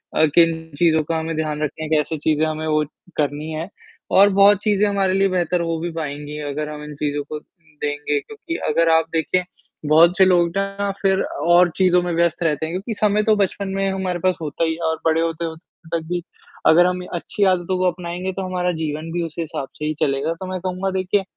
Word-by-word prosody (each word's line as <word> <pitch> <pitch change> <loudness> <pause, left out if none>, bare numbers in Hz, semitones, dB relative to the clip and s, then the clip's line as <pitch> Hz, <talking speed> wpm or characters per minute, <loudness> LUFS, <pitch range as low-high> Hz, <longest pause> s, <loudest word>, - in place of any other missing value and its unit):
अ, 160 - +5
किन 165 -1 +3
चीज़ों 160 -2 +4
का 165 +2 -2
हमें 160 0 -3
ध्यान 155 -1 -2
रखना 155 +1 -4
है, 155 - -5
कैसे 155 0 +1
चीज़े 155 +1 +1
हमें 155 0 -3
वो 155 0 +2 0.3
करनी 150 +1 -1
है 160 +4 -4 0.5
और 200 +1 +8
बहुत 200 +1 +6
चीज़ें 210 -1 +3
हमारे 195 -2 +1
लिए 195 0 +3
बेहतर 180 -1 0
हो 165 -1 -1
भी 170 +1 -3
पाएँगी 150 -1 -5
अगर 150 +2 -3
हम 150 0 -7
इन 150 0 -8
चीज़ों 145 0 -2
को 155 - -4
देंगे 150 -4 -4
क्योंकि 395 -6 -7
अगर 165 +2 +3
आप 160 0 +4
देखें, 180 +3 +1 0.4
बहुत 165 +5 +5
से 190 - +7
लोग 175 -2 +4
ना 195 0 -1
फिर 190 -1 +2
और 175 +3 +3
चीज़ों 180 -1 +4
में 175 - -2
व्यस्त 170 0 +1
रहते 155 -1 0
हैं, 165 - -5
क्योंकि 200 +5 -3
समय 210 0 +2
तो 215 -1 +4
बचपन 200 0 -1
में 195 0 0
हमारे 185 -2 -2
पास 185 +1 +1
होता 155 +1 -2
ही 160 0 +1
है 165 - -9
और 160 - 0
बड़े 160 0 +3
होते-होते 165 0 -5
तक - - -10
भी 175 -1 -2 0.4
अगर 175 +3 +6
हम 180 0 -1
अच्छी 200 +4 -2
आदतों 180 +1 -1
को 180 -1 +2
अपनाएँगे 180 +2 -5
तो 195 - -4
हमारा 180 -1 -1
जीवन 155 +1 -4
भी 175 0 -1
उसी 165 +1 -6
हिसाब 145 -4 -4
से 150 - -3
ही 155 - 0
चलेगा, 140 +4 0
तो 185 +3 -8
मैं 185 - -3
कहूँगा 185 +1 -2
देखिए, 190 +1 0
170 Hz, 220 wpm, -21 LUFS, 155-185 Hz, 0.5 s, और